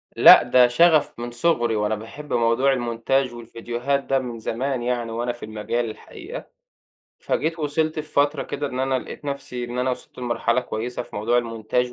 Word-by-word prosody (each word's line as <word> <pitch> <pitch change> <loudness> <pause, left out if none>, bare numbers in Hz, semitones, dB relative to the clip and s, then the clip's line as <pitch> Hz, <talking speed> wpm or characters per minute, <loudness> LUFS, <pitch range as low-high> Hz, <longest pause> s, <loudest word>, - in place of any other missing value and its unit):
لأ - - +9
ده 125 +1 +5
شَغَف 155 +2 +3
من 120 0 -5
صغري، 120 -3 +1
وأنا 105 0 0
باحِب 115 +8 -8
موضوع 120 +4 +3
المونتاج 125 +1 0
والفيديوهات 120 +4 -3
ده 135 0 +1
من 120 -3 -6
زمان 125 +3 -2
يعني، 120 -2 -1
وأنا 120 +2 -2
في 120 - -11
المجال 110 +2 -2
الحقيقة. 415 - -9 0.8
فجيت 165 +2 -1
وصَلت 155 +1 0
في - - -1
فترة 145 +1 +2
كده 145 +1 -4
إن 130 -2 -4
أنا 130 0 +1
لقِيت 130 - -9
نفسي 140 -3 -4
إن 120 +1 -5
أنا 130 +1 +1
وصَلت 125 - -7
لمرحلة 120 0 0
كويسة 120 0 -4
في - - -11
موضوع 115 +4 +2
المونتاج 120 +1 -1
125 Hz, 175 wpm, -23 LUFS, 115-140 Hz, 0.8 s, لأ